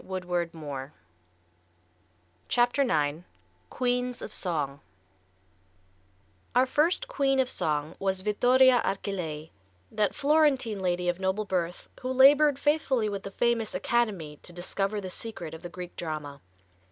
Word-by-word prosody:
[Illustration: 170 Hz, -7 st, -4 dB, 1.6 s
JENNY 245 Hz, +3 st, +3 dB
LIND] 145 Hz, -1 st, +1 dB
IX 180 Hz, -, -20 dB, 0.4 s
Queens 250 Hz, 0 st, -1 dB
of -, -, -7 dB
Song 145 Hz, -6 st, -1 dB, 1.8 s
Our 250 Hz, +1 st, +5 dB
first 330 Hz, -, +1 dB
queen 275 Hz, -, +1 dB
of 260 Hz, -, +3 dB
song 155 Hz, -, -1 dB
was 190 Hz, -1 st, 0 dB
Vittoria 245 Hz, +5 st, +4 dB
Archilei, 175 Hz, -6 st, -3 dB, 0.4 s
that 215 Hz, -1 st, 0 dB
Florentine 280 Hz, -7 st, +2 dB
lady 180 Hz, -1 st, -1 dB
of 175 Hz, +1 st, 0 dB
noble 190 Hz, +3 st, -1 dB
birth 180 Hz, -3 st, -2 dB
who 255 Hz, 0 st, -3 dB
labored 280 Hz, +2 st, +6 dB
faithfully 275 Hz, -6 st, +1 dB
with 200 Hz, -1 st, -4 dB
the 195 Hz, -, -7 dB
famous 230 Hz, +1 st, 0 dB
"Academy" 195 Hz, -11 st, -1 dB
to -, -, -7 dB
discover 195 Hz, +4 st, -2 dB
the 190 Hz, -2 st, -6 dB
secret 180 Hz, -7 st, -7 dB
of 160 Hz, -, -9 dB
the 175 Hz, -, -7 dB
Greek 180 Hz, 0 st, -8 dB
drama. 150 Hz, -4 st, -5 dB
195 Hz, 130 wpm, -28 LUFS, 175-250 Hz, 1.8 s, labored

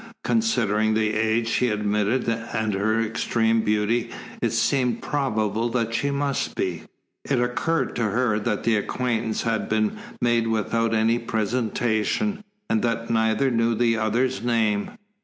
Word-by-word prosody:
Considering 110 Hz, -, +1 dB
the 110 Hz, -1 st, +1 dB
age 110 Hz, +1 st, +1 dB
she 125 Hz, +2 st, +1 dB
admitted 105 Hz, +3 st, 0 dB
and 115 Hz, -2 st, -1 dB
her 110 Hz, +3 st, +1 dB
extreme 115 Hz, 0 st, +1 dB
beauty 110 Hz, +3 st, 0 dB, 0.3 s
it -, -, +2 dB
seemed 125 Hz, -4 st, +1 dB
probable 115 Hz, -5 st, -1 dB
that 115 Hz, -1 st, -1 dB
she 140 Hz, +4 st, 0 dB
must 140 Hz, -1 st, -1 dB
be. 90 Hz, -4 st, -2 dB, 0.4 s
It 135 Hz, -3 st, 0 dB
occurred 125 Hz, +7 st, 0 dB
to 115 Hz, -, +1 dB
her 110 Hz, 0 st, +1 dB
that 105 Hz, 0 st, -2 dB
the 115 Hz, -2 st, +3 dB
acquaintance 115 Hz, +1 st, -1 dB
had 115 Hz, -2 st, -1 dB
been 110 Hz, -1 st, 0 dB, 0.2 s
made 120 Hz, -1 st, +2 dB
without 115 Hz, +1 st, 0 dB
any 115 Hz, +2 st, +2 dB
presentation, 115 Hz, -, -1 dB, 0.2 s
and 110 Hz, -, +1 dB
that 115 Hz, -1 st, -1 dB
neither 110 Hz, +3 st, +2 dB
knew 115 Hz, 0 st, +2 dB
the 115 Hz, 0 st, +2 dB
other's 115 Hz, +4 st, 0 dB
name. 110 Hz, -4 st, +1 dB
115 Hz, 140 wpm, -24 LUFS, 110-120 Hz, 0.4 s, the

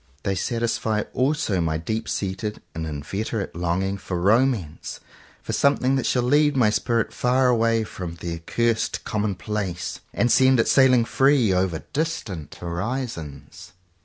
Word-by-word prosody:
They 100 Hz, -, 0 dB
satisfy 110 Hz, +1 st, -1 dB
also 130 Hz, -, +1 dB
my 80 Hz, -1 st, 0 dB
deep 110 Hz, +8 st, -3 dB
seated 100 Hz, +2 st, -3 dB
and 80 Hz, 0 st, -4 dB
inveterate 95 Hz, +9 st, -4 dB
longing 90 Hz, +3 st, -1 dB
for 90 Hz, -2 st, -4 dB
Romance, 105 Hz, -, +1 dB, 0.4 s
for -, -, -4 dB
some 140 Hz, 0 st, +3 dB
thing 130 Hz, +1 st, +1 dB
that 135 Hz, -, 0 dB
shall 125 Hz, -, +1 dB
lead 145 Hz, +3 st, +3 dB
my 110 Hz, -5 st, +4 dB
spirit 115 Hz, +1 st, 0 dB
far 125 Hz, +1 st, +2 dB
away 115 Hz, -1 st, +2 dB
from 90 Hz, -5 st, -6 dB
the 85 Hz, 0 st, -5 dB
accursed 115 Hz, +7 st, -1 dB
commonplace, 105 Hz, -3 st, -3 dB
and 120 Hz, -, +1 dB
send 130 Hz, -1 st, +5 dB
it 115 Hz, -, +3 dB
sailing 130 Hz, -3 st, +5 dB
free 135 Hz, -5 st, +3 dB
over 90 Hz, -4 st, 0 dB
distant 125 Hz, -, -3 dB
horizons. 85 Hz, -, -5 dB
110 Hz, 140 wpm, -24 LUFS, 90-125 Hz, 0.4 s, send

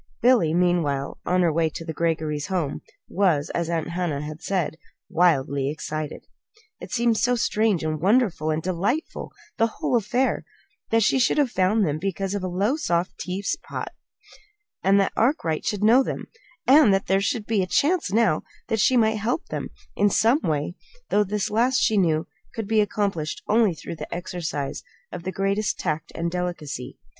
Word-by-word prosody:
Billy, 240 Hz, -10 st, +4 dB
meanwhile, 165 Hz, -5 st, 0 dB
on 180 Hz, 0 st, +3 dB
her 165 Hz, -2 st, +2 dB
way 165 Hz, 0 st, +2 dB
to 165 Hz, +1 st, -8 dB
the 160 Hz, -, -4 dB
Greggory 155 Hz, -2 st, -1 dB
home, 160 Hz, -2 st, -2 dB, 0.3 s
was, 170 Hz, -7 st, +1 dB
as 170 Hz, -1 st, -2 dB
Aunt 165 Hz, -1 st, -1 dB
Hannah 170 Hz, -5 st, -2 dB
had 155 Hz, +2 st, -7 dB
said, 175 Hz, -5 st, -1 dB, 0.3 s
"wildly 140 Hz, -5 st, +2 dB
excited." 155 Hz, 0 st, -5 dB, 0.5 s
It -, -, -9 dB
seemed 235 Hz, -2 st, +2 dB
so 245 Hz, 0 st, +2 dB
strange 215 Hz, -6 st, +1 dB
and 155 Hz, -1 st, -2 dB
wonderful 195 Hz, -, +2 dB
and 155 Hz, 0 st, -1 dB
delightful 195 Hz, -, -2 dB, 0.3 s
the 225 Hz, -, +4 dB
whole 230 Hz, -, -2 dB
affair: 240 Hz, +4 st, +1 dB, 0.5 s
that 225 Hz, 0 st, +3 dB
she 260 Hz, -, +3 dB
should 250 Hz, -, +2 dB
have 285 Hz, -5 st, +2 dB
found 200 Hz, +2 st, +2 dB
them 150 Hz, -1 st, -1 dB
because 195 Hz, +1 st, -2 dB
of 200 Hz, -2 st, -3 dB
a -, -, -1 dB
Lowestoft 185 Hz, -, 0 dB
teapot, 190 Hz, +2 st, -4 dB, 0.9 s
that 195 Hz, 0 st, +3 dB
Arkwright 220 Hz, -, +1 dB
should 205 Hz, -1 st, -1 dB
know 235 Hz, +5 st, +6 dB
them, -, -, -4 dB, 0.4 s
and 275 Hz, -5 st, +7 dB
that 195 Hz, 0 st, +1 dB
there 195 Hz, +1 st, +2 dB
should 220 Hz, +1 st, -1 dB
be 220 Hz, -2 st, 0 dB
the 185 Hz, -, +1 dB
chance 310 Hz, -, +1 dB
now 215 Hz, -7 st, +3 dB, 0.3 s
that 225 Hz, -, 0 dB
she 255 Hz, +5 st, +4 dB
might 220 Hz, -1 st, +3 dB
help 230 Hz, +8 st, -2 dB
them -, -, -4 dB, 0.3 s
in 205 Hz, +1 st, +3 dB
some 230 Hz, +8 st, +3 dB
way; 150 Hz, +1 st, -1 dB, 0.4 s
though 210 Hz, -, +3 dB
this 205 Hz, +1 st, -2 dB
last, 245 Hz, +4 st, +2 dB
she 220 Hz, -, +2 dB
knew, 165 Hz, -5 st, +2 dB, 0.3 s
could 225 Hz, -3 st, -4 dB
be 220 Hz, 0 st, +3 dB
accomplished 195 Hz, -6 st, -2 dB
only 215 Hz, -4 st, +3 dB
through 160 Hz, +2 st, -7 dB
the 150 Hz, -, -8 dB
exercise 170 Hz, -5 st, -4 dB, 0.3 s
of 180 Hz, -, -6 dB
the 185 Hz, +2 st, -4 dB
greatest 195 Hz, +2 st, 0 dB
tact 155 Hz, -2 st, -3 dB
and 170 Hz, 0 st, -2 dB
delicacy. 170 Hz, -8 st, -4 dB
185 Hz, 170 wpm, -24 LUFS, 160-220 Hz, 0.9 s, and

